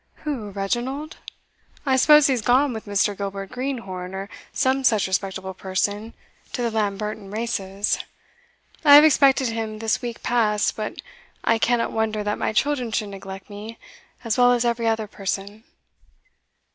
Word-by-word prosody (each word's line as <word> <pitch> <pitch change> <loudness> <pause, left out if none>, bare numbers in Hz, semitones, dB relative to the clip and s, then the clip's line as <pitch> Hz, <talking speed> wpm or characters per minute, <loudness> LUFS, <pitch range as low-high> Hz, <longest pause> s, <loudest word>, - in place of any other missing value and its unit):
"Who, 255 -9 -3
Reginald? 240 +10 -3 0.7
I 265 -2 +3
suppose 300 +3 +6
he's 260 -5 +2
gone 255 +4 +3
with 220 -1 -7
Mr. 205 0 +1
Gilbert 195 0 -5
Greenhorn, 195 -9 -4
or 195 +1 -5 0.2
some 265 0 +1
such 220 -6 +3
respectable 190 0 -2
person, 205 +4 -2 0.4
to 245 - -2
the 235 - 0
Lamberton 210 -1 -2
races 205 -2 -2 0.8
I 290 -2 +9
have 295 - +10
expected 270 -4 +4
him 225 -1 -4
this 220 0 -1
week 240 -1 -6
past; 215 -3 +1
but 215 -1 -5 0.4
I 225 0 +2
cannot 235 0 +1
wonder 220 -1 -1
that 210 0 -2
my - - 0
children 250 0 0
should 210 -1 -1
neglect 195 -1 -9
me 215 +2 -9 0.5
as 230 +1 -1
well 245 0 +6
as 240 0 +1
every 235 -1 0
other 225 -1 +1
person. 200 +2 -5
220 Hz, 150 wpm, -23 LUFS, 200-245 Hz, 0.8 s, have